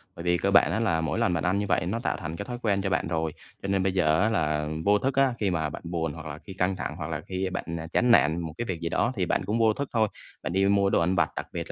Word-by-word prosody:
Bởi 85 Hz, -, -7 dB
vì 90 Hz, 0 st, +2 dB
cơ 100 Hz, -, 0 dB
bản 100 Hz, -, +5 dB
á -, -, 0 dB
là 85 Hz, -8 st, +1 dB
mỗi 80 Hz, -3 st, -1 dB
lần 90 Hz, -, +2 dB
bạn 85 Hz, -, -1 dB
ăn 90 Hz, +3 st, +1 dB
như 105 Hz, -, -1 dB
vậy -, -, +1 dB
nó 110 Hz, +6 st, -1 dB
tạo -, -, -1 dB
thành 80 Hz, +1 st, -5 dB
cái -, -, -5 dB
thói 120 Hz, -1 st, -5 dB
quen 100 Hz, -3 st, +1 dB
cho 95 Hz, -, -1 dB
bạn 90 Hz, -, 0 dB
rồi, 80 Hz, -2 st, -1 dB, 0.3 s
cho 100 Hz, -, -4 dB
nên 95 Hz, -1 st, +1 dB
bây 95 Hz, -1 st, +1 dB
giờ 80 Hz, -2 st, +3 dB
á 105 Hz, -, +3 dB
là 75 Hz, -7 st, 0 dB, 0.2 s
vô 105 Hz, +1 st, +5 dB
thức 135 Hz, +1 st, -1 dB
á, 135 Hz, -2 st, +3 dB
khi 100 Hz, -3 st, +1 dB
mà 80 Hz, -3 st, -1 dB
bạn -, -, -8 dB
buồn 85 Hz, -3 st, -2 dB
hoặc 80 Hz, -1 st, -9 dB
là 75 Hz, -1 st, -6 dB
khi 95 Hz, -, -11 dB
căng 95 Hz, +1 st, 0 dB
thẳng 80 Hz, -, -4 dB
hoặc 75 Hz, -4 st, -4 dB
là 75 Hz, -, -3 dB
khi 95 Hz, 0 st, -2 dB
bạn -, -, -3 dB, 0.3 s
chán 125 Hz, -1 st, +3 dB
nản 80 Hz, -6 st, +5 dB
một 80 Hz, -2 st, -5 dB
cái 120 Hz, -, -2 dB
việc 95 Hz, -6 st, -3 dB
gì 85 Hz, -, -2 dB
đó 120 Hz, +9 st, +1 dB
thì 95 Hz, -4 st, 0 dB
bạn -, -, 0 dB
cũng 105 Hz, +4 st, 0 dB
vô 110 Hz, -1 st, +4 dB
thức 140 Hz, +4 st, -4 dB
thôi. 110 Hz, -2 st, +3 dB, 0.4 s
Bạn -, -, -3 dB
đi 95 Hz, +1 st, +3 dB
mua 100 Hz, 0 st, +3 dB
đồ -, -, +3 dB
ăn 90 Hz, +3 st, +1 dB
vặt, 85 Hz, -4 st, +2 dB
đặc -, -, -4 dB
biệt -, -, -4 dB
95 Hz, 330 wpm, -27 LUFS, 80-105 Hz, 0.4 s, bản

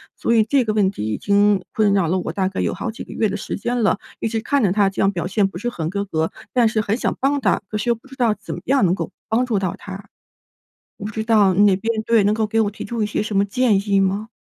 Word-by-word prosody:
所 230 Hz, -, 0 dB
以 225 Hz, -2 st, +5 dB
这 260 Hz, +4 st, +2 dB
个 215 Hz, -, 0 dB
问 200 Hz, -3 st, +3 dB
题 185 Hz, -, -6 dB
已 -, -, -2 dB
经 205 Hz, -1 st, +3 dB
困 210 Hz, -2 st, +2 dB
扰 195 Hz, -4 st, +2 dB
了 185 Hz, +4 st, +1 dB
我 175 Hz, -, -4 dB
大 190 Hz, -1 st, 0 dB
概 190 Hz, -, -5 dB
有 -, -, 0 dB
好 -, -, -4 dB
几 220 Hz, -, -7 dB
个 -, -, -10 dB
月 220 Hz, -2 st, +1 dB
的 205 Hz, -, -3 dB
时 -, -, -5 dB
间 240 Hz, +4 st, -2 dB
了， 200 Hz, -1 st, +2 dB, 0.2 s
一 -, -, -1 dB
直 225 Hz, 0 st, -1 dB
看 280 Hz, +2 st, +1 dB
着 195 Hz, -, +3 dB
她 200 Hz, 0 st, +3 dB
这 195 Hz, -, -9 dB
样 195 Hz, -, +3 dB
表 175 Hz, -2 st, -3 dB
现 195 Hz, +1 st, +1 dB
不 195 Hz, -, -8 dB
是 240 Hz, -, -2 dB
很 165 Hz, -9 st, -4 dB
合 200 Hz, +1 st, -2 dB
格， 160 Hz, -4 st, -1 dB, 0.2 s
但 240 Hz, -3 st, +3 dB
是 220 Hz, -1 st, 0 dB
很 215 Hz, +1 st, -1 dB
想 -, -, -1 dB
帮 280 Hz, +2 st, +2 dB
她， 210 Hz, -7 st, +1 dB
可 215 Hz, -, -2 dB
是 210 Hz, +3 st, -2 dB
又 235 Hz, -, +2 dB
不 230 Hz, -, -19 dB
知 265 Hz, -, -12 dB
道 240 Hz, -4 st, +2 dB
怎 -, -, -7 dB
么 -, -, -8 dB
样 275 Hz, -4 st, +2 dB
能 180 Hz, 0 st, +3 dB
够 -, -, -5 dB, 0.2 s
帮 240 Hz, +3 st, +2 dB
助 220 Hz, -5 st, 0 dB
到 185 Hz, -3 st, -2 dB
她。 195 Hz, 0 st, -9 dB, 0.9 s
我 205 Hz, -, -7 dB
不 210 Hz, -, -4 dB
知 220 Hz, +1 st, -3 dB
道 210 Hz, -4 st, +4 dB
你 205 Hz, +3 st, +4 dB
那 200 Hz, -2 st, +5 dB
边 225 Hz, +2 st, -2 dB
对， 225 Hz, -2 st, +3 dB
能 205 Hz, -, +3 dB
够 220 Hz, 0 st, 0 dB
给 225 Hz, +2 st, 0 dB
我 205 Hz, -2 st, 0 dB
提 210 Hz, -, -8 dB
出 230 Hz, 0 st, -2 dB
一 -, -, +1 dB
些 210 Hz, -, -2 dB
什 210 Hz, -1 st, -2 dB
么 200 Hz, -, +3 dB
建 230 Hz, -2 st, +2 dB
议 200 Hz, -1 st, +4 dB
吗？ 195 Hz, +3 st, 0 dB
210 Hz, 330 characters per minute, -21 LUFS, 195-225 Hz, 0.9 s, 以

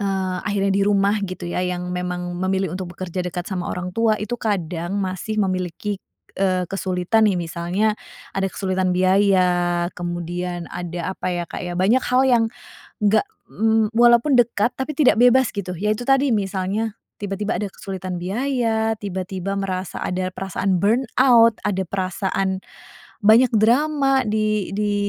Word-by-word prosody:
eee, 190 Hz, -2 st, -1 dB
akhirnya 200 Hz, -1 st, +1 dB
di 200 Hz, -, +2 dB
rumah, 200 Hz, +1 st, +3 dB
gitu, 185 Hz, -1 st, -6 dB
ya, 180 Hz, -, -1 dB
yang 180 Hz, 0 st, -3 dB
memang 180 Hz, 0 st, -3 dB
memilih 190 Hz, -1 st, 0 dB
untuk 185 Hz, -1 st, -5 dB
bekerja 185 Hz, 0 st, -4 dB
dekat 180 Hz, 0 st, -4 dB
sama 180 Hz, -3 st, -3 dB
orang 180 Hz, 0 st, -4 dB
tua 225 Hz, -1 st, +3 dB
itu 210 Hz, +2 st, -5 dB
kadang 180 Hz, -3 st, -2 dB
masih 190 Hz, +3 st, -3 dB
memiliki, 185 Hz, +1 st, -2 dB, 0.4 s
eee, 185 Hz, -2 st, +2 dB
kesulitan, 190 Hz, +3 st, +1 dB
nih. 190 Hz, -, +1 dB
Misalnya, 175 Hz, +6 st, -1 dB, 0.4 s
ada 195 Hz, 0 st, 0 dB
kesulitan 185 Hz, -1 st, -1 dB
biaya, 180 Hz, -2 st, +3 dB
kemudian 175 Hz, 0 st, -4 dB
ada 175 Hz, 0 st, -4 dB
apa, -, -, -3 dB
ya, 175 Hz, -1 st, -2 dB
Kak, -, -, -6 dB
ya, 175 Hz, 0 st, -4 dB
banyak 215 Hz, +8 st, +4 dB
hal 250 Hz, +1 st, +3 dB
yang 235 Hz, -2 st, +4 dB, 0.6 s
enggak, 210 Hz, +1 st, +4 dB, 0.3 s
mmm, 220 Hz, 0 st, +1 dB
walaupun 240 Hz, +3 st, +5 dB
dekat 235 Hz, 0 st, +2 dB
tapi 265 Hz, +3 st, -3 dB
tidak 290 Hz, -7 st, +5 dB
bebas, 250 Hz, +1 st, +5 dB
gitu. 185 Hz, -2 st, -3 dB
Ya, 210 Hz, +1 st, +1 dB
itu 245 Hz, -, -6 dB
tadi, 270 Hz, +1 st, +4 dB
misalnya 200 Hz, +2 st, -1 dB, 0.3 s
tiba-tiba 205 Hz, 0 st, -2 dB
ada 205 Hz, -, -2 dB
kesulitan 185 Hz, -2 st, -6 dB
biaya, 225 Hz, +1 st, 0 dB
tiba-tiba 190 Hz, 0 st, -4 dB
merasa 185 Hz, -2 st, -3 dB
ada 185 Hz, 0 st, -2 dB
perasaan 190 Hz, 0 st, -1 dB
burnout, 230 Hz, +1 st, +4 dB
ada 190 Hz, -2 st, 0 dB
perasaan 190 Hz, 0 st, -1 dB, 0.7 s
banyak 230 Hz, +3 st, +6 dB
drama 270 Hz, +4 st, +3 dB
di 215 Hz, -1 st, 0 dB
di 210 Hz, -1 st, 0 dB
195 Hz, 150 wpm, -22 LUFS, 180-220 Hz, 0.7 s, banyak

